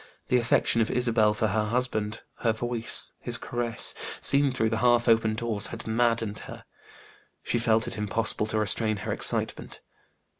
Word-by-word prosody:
The 125 - +4
affection 115 0 +2
of 110 - 0
Isabel 115 -4 +2
for 110 0 0
her 105 +2 0
husband, 110 -2 -1 0.2
her 115 -2 +1
voice, 120 0 -1
his - - -3
caresses 120 -2 -2 0.3
seen 140 0 +4
through 110 -4 0
the 110 - -1
half 120 0 +3
open 115 -1 +3
doors 110 -2 -2
had 115 -1 -8
maddened 115 -2 0
her. - - -10 0.8
She 120 - -1
felt 115 -1 +2
it - - -5
impossible 105 +1 -1
to 110 - -2
restrain 110 0 +3
her - - -1
excitement. - - -1
115 Hz, 160 wpm, -27 LUFS, 110-120 Hz, 0.8 s, The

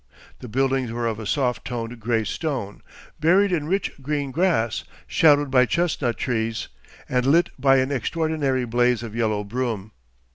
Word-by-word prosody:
The 125 - -8
buildings 130 +1 0
were 120 0 -2
of 115 -1 -2
a 110 - -5
soft 125 +3 0
toned 120 -1 -5
gray 115 0 0
stone, 125 - -4 0.4
buried 190 +5 +4
in 155 -4 -1
rich 195 +3 0
green 145 0 -2
grass, 155 -8 +1 0.2
shadowed 145 -3 +4
by 125 -2 +5
chestnut 145 -9 0
trees 115 -4 -2 0.4
and 125 -1 +1
lit 165 +5 +4
by 135 -1 +5
an 130 +1 +1
extraordinary 140 -1 0
blaze 120 0 +1
of 115 -2 -7
yellow 110 -3 0
broom. 110 -2 -3
125 Hz, 155 wpm, -23 LUFS, 115-145 Hz, 0.4 s, by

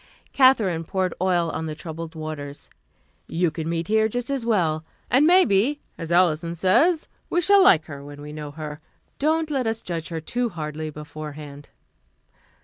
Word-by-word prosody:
Katherine 220 -11 +4
poured 185 +1 -1
oil 175 -3 +2
on 160 - -3
the 155 - -4
troubled 165 0 -7
waters. 155 -2 -7 0.6
"You 170 0 0
can 160 +1 -4
meet 165 0 -2
here 220 0 +3
just 245 +4 -3
as 270 -3 -1
well. 170 -9 +1 0.3
And 275 +5 +5
maybe, 290 - +4 0.2
as 165 0 -6
Alison 170 -1 +2
says, 305 - +3 0.2
we 350 - +2
shall 400 +3 +5
like 165 - +6
her 140 -2 -9
when 145 0 -10
we 150 +1 -8
know 150 -1 -6
her. 150 0 -7 0.4
Don't 315 +1 +1
let 265 -5 0
us 225 0 -2
judge 165 -2 -4
her 165 -2 -3
too 240 +9 -2
hardly 155 -3 -5
beforehand." 150 -1 -9
170 Hz, 165 wpm, -24 LUFS, 155-230 Hz, 0.6 s, like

